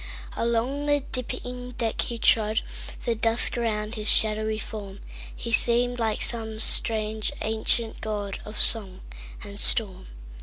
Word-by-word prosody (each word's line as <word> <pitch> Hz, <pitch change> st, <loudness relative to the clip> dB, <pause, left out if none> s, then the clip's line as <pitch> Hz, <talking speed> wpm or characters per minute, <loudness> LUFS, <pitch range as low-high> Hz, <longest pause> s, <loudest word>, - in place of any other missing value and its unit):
Along 240 Hz, +5 st, -2 dB
the 290 Hz, 0 st, +1 dB
dipping 250 Hz, 0 st, -6 dB
deck 225 Hz, -2 st, -2 dB
he 235 Hz, -, -4 dB
trod, 220 Hz, -1 st, +2 dB, 0.4 s
The 235 Hz, -, 0 dB
dusk 225 Hz, +1 st, +3 dB
about 215 Hz, -2 st, -3 dB
his 215 Hz, -2 st, -5 dB
shadowy 215 Hz, 0 st, +1 dB
form; 205 Hz, -2 st, -9 dB, 0.4 s
He 235 Hz, -, -7 dB
seemed 245 Hz, +1 st, +4 dB
like 220 Hz, -2 st, -1 dB
some 220 Hz, -2 st, +1 dB
strange 215 Hz, -1 st, +1 dB
ancient 220 Hz, +1 st, -2 dB
godOf 210 Hz, 0 st, -6 dB
song 195 Hz, -5 st, +2 dB, 0.4 s
and 200 Hz, -1 st, -7 dB
storm. 190 Hz, -6 st, +4 dB
220 Hz, 125 wpm, -24 LUFS, 215-235 Hz, 0.4 s, seemed